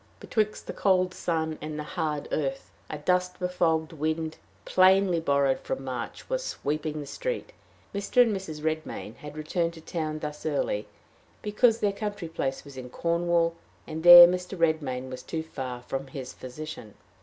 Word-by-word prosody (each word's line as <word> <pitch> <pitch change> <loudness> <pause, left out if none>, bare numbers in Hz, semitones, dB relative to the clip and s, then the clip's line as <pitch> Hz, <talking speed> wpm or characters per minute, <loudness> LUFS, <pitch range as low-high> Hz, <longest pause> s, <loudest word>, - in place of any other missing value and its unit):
Betwixt 215 -1 -1
the - - -5
cold 185 -2 +2
sun 160 -3 -2
and 155 0 -5
the 150 - -3
hard 155 -3 -3
earth, 135 -11 -2 0.2
a 150 - -4
dust 180 +4 0
befogged 170 -3 0
wind, 160 +1 -2 0.3
plainly 185 -1 +5
borrowed 140 -3 +2
from 135 - -4
March, 125 -3 -5
was - - -1
sweeping 155 - -3
the 145 - -5
street. 485 - -4 0.4
Mr. 200 +5 +4
and 225 -4 0
Mrs. 160 -6 -6
Redmain 155 0 -3
had 150 -1 -10
returned 165 +2 -1
to 160 - -11
town 155 -2 -3
thus 150 -1 -6
early - - -1 0.6
because 225 +2 +3
their 205 -1 +2
country 205 -3 -4
place 135 -5 -3
was 140 -2 -11
in 125 -1 -7
Cornwall, 170 +2 +1 0.3
and 155 +1 -5
there 175 0 +12
Mr. 180 +1 -3
Redmain 145 -6 0
was 130 - -6
too 160 -1 -4
far 130 -6 -6
from 135 +2 -4
his 130 -1 -7
physician. 130 -4 -8
160 Hz, 165 wpm, -27 LUFS, 150-180 Hz, 0.6 s, there